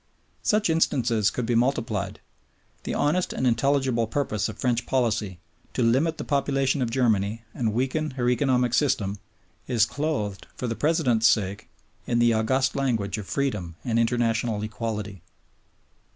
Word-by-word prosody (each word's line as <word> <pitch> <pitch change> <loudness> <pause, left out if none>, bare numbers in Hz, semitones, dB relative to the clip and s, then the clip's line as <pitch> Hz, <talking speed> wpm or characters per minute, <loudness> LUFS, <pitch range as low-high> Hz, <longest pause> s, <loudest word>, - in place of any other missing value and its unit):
Such 210 0 +2
instances 120 -9 +2
could 125 - -3
be 120 - 0
multiplied. 115 -4 0 0.6
The - - -2
honest 165 +5 +1
and - - -1
intelligible 130 -1 +2
purpose 110 -5 -1
of 110 - -8
French 125 -1 0
policy, 110 -7 0 0.4
to 125 - +1
limit 135 +8 +2
the - - -4
population 140 -1 +1
of 120 - 0
Germany 110 -3 +1
and 115 -3 -1
weaken 135 +7 -1
her 120 -1 0
economic 125 -1 +2
system, 105 -7 +1 0.5
is 115 -4 +3
clothed, 125 -6 -3
for - - -4
the 115 -1 -2
President's 130 -8 +2
sake, 100 -2 0 0.4
in 120 - +1
the 120 -1 +4
august 130 +5 +1
language 115 -7 -1
of 100 - -8
freedom 105 -12 -2
and 115 -2 +1
international 115 -2 0
equality. 105 -3 -4
120 Hz, 145 wpm, -25 LUFS, 110-135 Hz, 0.6 s, the